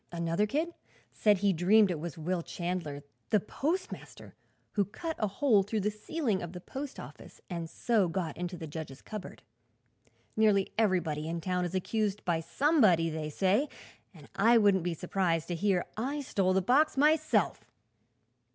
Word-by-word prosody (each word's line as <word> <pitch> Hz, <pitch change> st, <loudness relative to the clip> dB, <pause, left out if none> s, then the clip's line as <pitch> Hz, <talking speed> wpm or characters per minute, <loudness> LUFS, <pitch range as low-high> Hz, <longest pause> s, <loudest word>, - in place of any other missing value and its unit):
Another 170 Hz, +4 st, 0 dB
kid 315 Hz, +8 st, -1 dB, 0.4 s
said 210 Hz, -2 st, +3 dB
he 200 Hz, 0 st, +2 dB
dreamed 190 Hz, +4 st, +4 dB
it 165 Hz, -, -3 dB
was 165 Hz, -1 st, -6 dB
Will 175 Hz, +2 st, -1 dB
Chandler, 170 Hz, -5 st, -4 dB, 0.3 s
the 215 Hz, -, +4 dB
postmaster, 330 Hz, -, -4 dB, 0.4 s
who 205 Hz, -, +2 dB
cut 320 Hz, -, -5 dB
a 215 Hz, -, +1 dB
hole 205 Hz, +1 st, +3 dB
through 210 Hz, +2 st, -2 dB
the 210 Hz, +2 st, 0 dB
ceiling 215 Hz, -, -2 dB
of 175 Hz, 0 st, -6 dB
the 180 Hz, -, -6 dB
post 270 Hz, +9 st, -7 dB
office -, -, -11 dB
and 170 Hz, -2 st, -4 dB
so 220 Hz, -2 st, +1 dB
got 165 Hz, -3 st, -3 dB
into 180 Hz, +1 st, -4 dB
the 160 Hz, -, -6 dB
judge's 150 Hz, -3 st, -7 dB
cupboard. 215 Hz, -4 st, -8 dB, 0.9 s
Nearly 210 Hz, -3 st, +3 dB
everybody 170 Hz, -8 st, 0 dB
in 170 Hz, 0 st, -2 dB
town 180 Hz, +1 st, -1 dB
is 175 Hz, +2 st, -4 dB
accused 210 Hz, +2 st, -1 dB
by 170 Hz, -2 st, +1 dB
somebody, 185 Hz, -, +3 dB
they 155 Hz, -1 st, -4 dB
say, 195 Hz, -, +1 dB, 0.4 s
and 150 Hz, -7 st, -15 dB
I 225 Hz, +5 st, +5 dB
wouldn't 200 Hz, -5 st, +4 dB
be 175 Hz, -1 st, -1 dB
surprised 175 Hz, -1 st, -1 dB
to -, -, -1 dB
hear 185 Hz, 0 st, +1 dB
that 220 Hz, -, -4 dB
I 285 Hz, +3 st, -2 dB
stole 195 Hz, -8 st, +1 dB
the 190 Hz, 0 st, +2 dB
box 275 Hz, -, +3 dB
myself." 295 Hz, -, +2 dB
190 Hz, 170 wpm, -30 LUFS, 170-220 Hz, 0.9 s, I